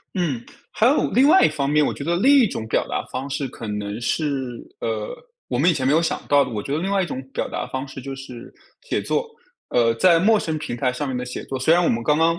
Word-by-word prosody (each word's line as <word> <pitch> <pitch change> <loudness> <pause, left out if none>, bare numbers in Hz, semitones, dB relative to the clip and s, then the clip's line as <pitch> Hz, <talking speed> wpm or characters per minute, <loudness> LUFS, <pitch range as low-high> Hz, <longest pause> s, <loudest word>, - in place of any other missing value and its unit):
嗯， 145 -11 -1 0.3
还 220 - +2
有 280 +4 +3
另 260 +7 +4
外 370 +5 +6
一 - - +6
方 145 -3 -2
面。 150 +1 +3
我 - - 0
觉 - - -8
得 170 +3 +1
另 265 +10 +5
一 250 - +5
种 110 - -5
表 110 - 0
达 - - -2
方 130 +2 -4
式 140 0 -2
可 115 - -9
能 105 +1 -4
是 130 -2 -2 0.2
呃， 110 -2 -3 0.3
我 - - -1
们 - - +4
以 - - +3
前 130 -5 -1
没 135 - +3
有 160 - +4
想 165 - -1
到 145 -1 +5
的。 130 - -7
我 105 -3 -3
觉 140 - -5
得 - - 0
另 190 +3 -2
外 200 -1 +2
一 - - -2
种 130 -5 -5
表 - - -2
达 - - -4
方 130 +1 -4
式 135 0 -9
就 135 +1 -6
是 130 -3 -10 0.3
写 - - -2
作， 475 - -1 0.4
呃， 115 -1 +3
在 170 +8 +5
陌 215 +5 +4
生 160 -1 -2
平 120 -5 -5
台 125 +1 0
上 145 +3 -3
面 130 -2 -3
的 125 - -3
写 125 - -6
作。 135 - -4
虽 130 +5 +3
然 175 +1 +4
我 170 - +2
们 115 0 0
刚 150 +4 +2
刚 165 +1 +3
140 Hz, 305 characters per minute, -22 LUFS, 125-170 Hz, 0.4 s, 外